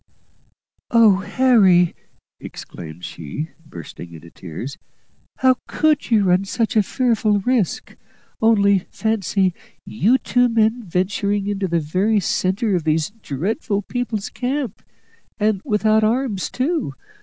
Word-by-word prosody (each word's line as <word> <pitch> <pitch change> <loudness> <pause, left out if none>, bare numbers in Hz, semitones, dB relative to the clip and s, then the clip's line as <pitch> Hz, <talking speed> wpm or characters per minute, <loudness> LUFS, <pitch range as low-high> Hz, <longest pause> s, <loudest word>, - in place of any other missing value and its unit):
"Oh! 225 -5 +5
Harry," 195 -6 +4 0.5
exclaimed 85 0 -9
she, 85 - -6
bursting 85 - -10
into 85 +1 -12
tears, 95 - -8 0.6
"how 260 -1 +3
could 305 -1 +1
you 220 -4 +4
run 185 0 +3
such 225 +4 -1
a 215 - +6
fearful 215 -2 +1
risk! 235 -4 -1 0.5
Only 200 -3 +4
fancy, 200 -4 0 0.3
you 220 +5 +2
two 245 -1 +2
men 225 +1 +2
venturing 195 +3 -1
into 200 -1 -1
the 170 -1 +1
very 185 +8 +1
centre 190 +3 0
of 175 - -1
these 155 +3 0
dreadful 200 - -2
people's 235 -2 -3
camp, 255 -3 -3 0.6
and 210 -2 +1
without 215 -2 +2
arms 225 -3 0
too! 265 - -2
205 Hz, 120 wpm, -20 LUFS, 180-230 Hz, 0.6 s, a